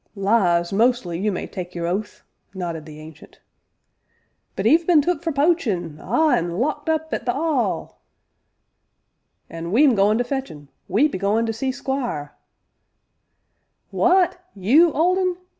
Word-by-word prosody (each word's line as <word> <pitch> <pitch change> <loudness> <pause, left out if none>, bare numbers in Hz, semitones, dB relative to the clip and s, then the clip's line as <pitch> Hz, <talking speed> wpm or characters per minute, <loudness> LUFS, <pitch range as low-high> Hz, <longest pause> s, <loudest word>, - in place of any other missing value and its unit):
"Lies, 195 -4 +1
mostly, 220 -6 +1
you 210 +2 0
may 185 - -4
tak' 180 -2 -8
your 170 -1 -3
oath!" 195 +5 -4 0.3
nodded 170 -4 -5
the 155 0 -11
Ancient. 155 0 -14 1.2
"But 195 - -3
'e've 320 +8 +4
been 345 -4 +6
took 350 +5 0
for 335 -1 -2
poachin', 230 - 0
ah! 305 - +1
an' 170 +1 0
locked 295 - -2
up 320 0 -1
at 235 - -4
the - - +3
'All 295 -4 -2 0.7
" - - -51
"An' 165 +1 -6
we 245 +9 +4
'm 280 -4 +5
goin' 210 +1 +3
to 245 - +1
fetch 265 +2 -4
un 145 -2 -13 0.2
we 215 +11 +3
be 235 - -6
goin' 210 +4 +1
to 225 - -2
see 260 +4 -2
Squire 255 - -4 0.8
" - - -50
"W'at 360 0 +3 0.2
you, 275 - +4
Old 355 +6 +2
Un? 365 -2 0
225 Hz, 160 wpm, -22 LUFS, 175-300 Hz, 1.2 s, been